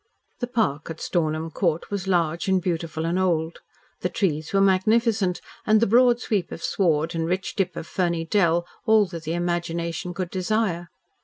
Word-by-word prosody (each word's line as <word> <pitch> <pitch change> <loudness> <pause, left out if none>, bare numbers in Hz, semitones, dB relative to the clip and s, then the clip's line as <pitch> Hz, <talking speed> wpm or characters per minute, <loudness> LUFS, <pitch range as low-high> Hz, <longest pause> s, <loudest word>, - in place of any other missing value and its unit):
The 245 - -2
park 165 - -1
at 165 - -6
Stornham 160 -1 -1
Court 170 -1 -1
was 195 -2 -3
large 170 -2 +1
and 190 -1 +3
beautiful 165 -2 -2
and 170 +3 0
old. 170 -3 0 0.4
The - - -1
trees 155 -5 -1
were 195 - +2
magnificent, 195 0 +2 0.2
and 215 0 +4
the 230 - +3
broad 240 +2 +5
sweep 210 -7 -1
of - - -7
sward 165 -3 +1
and 165 -1 -1
rich 185 +2 -2
dip 185 -3 -1
of - - -5
ferny 170 -2 -1
dell 170 -1 +2 0.2
all 220 -1 +6
that 170 -3 -8
the 160 +2 -1
imagination 175 0 -2
could 180 -2 -3
desire. 185 -2 -1
175 Hz, 175 wpm, -24 LUFS, 165-195 Hz, 0.4 s, all